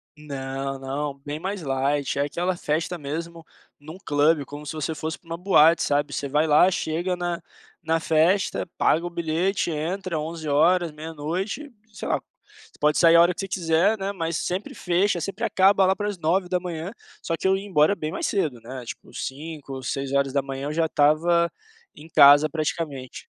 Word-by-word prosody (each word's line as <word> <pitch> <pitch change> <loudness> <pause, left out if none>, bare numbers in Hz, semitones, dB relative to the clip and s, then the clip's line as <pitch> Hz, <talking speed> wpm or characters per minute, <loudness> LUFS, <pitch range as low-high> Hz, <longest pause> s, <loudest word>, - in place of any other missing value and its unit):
Não, 135 -2 -5
não, 140 +2 -3
bem 145 +1 -4
mais 190 +2 -4
light, 140 -1 -1
é 140 - +2
aquela 175 +5 -1
festa 160 +3 -2
mesmo 165 +2 -6 0.3
num 155 +4 -10
club 145 +1 +2
como 145 +2 -9
se 150 - -5
você 155 +1 -3
fosse 160 +2 -4
para 170 - -26
uma 165 0 -4
boate, 170 -3 +5
sabe, 145 0 0
você 140 - -3
vai 150 +3 +1
lá 150 +4 +6
chega 175 +3 -1
na 175 -1 -3 0.4
na 165 0 +1
festa, 165 +7 +2
paga 165 +2 +2
o 175 - -3
bilhete, 170 +3 -1
entra 170 +2 -3
23h, 160 +2 +1
00h, 165 - -5 0.2
sei - - -6
lá, - - +3 0.3
você 430 +1 -22
pode 150 0 +3
sair 170 -1 +6
a 170 - +8
hora 175 +1 +4
que - - -15
você 195 - -3
quiser, 180 +3 +2
né, 195 +1 -2
mas 165 -4 -2
sempre 185 +3 -3
fecha, 180 0 +1
sempre 195 - -5
acaba 195 0 +4
lá 190 +1 +3
para 205 0 -2
as 205 - -5
9h, 180 0 -1 0.3
só 165 - -2
que - - -1
eu 190 - +4
ia 195 +1 -5
embora 175 0 +3
bem 155 -3 -4
mais - - -3
cedo 155 - -1
né, 125 +2 -8
tipo - - -9
5h, 140 -2 -6
6h 135 +1 -1
eu 150 - -3
já 165 0 +1
estava 170 +4 +3 0.5
em 160 +2 -13
casa 145 +1 +7
praticamente. 150 -4 -4
160 Hz, 180 wpm, -24 LUFS, 145-180 Hz, 0.5 s, a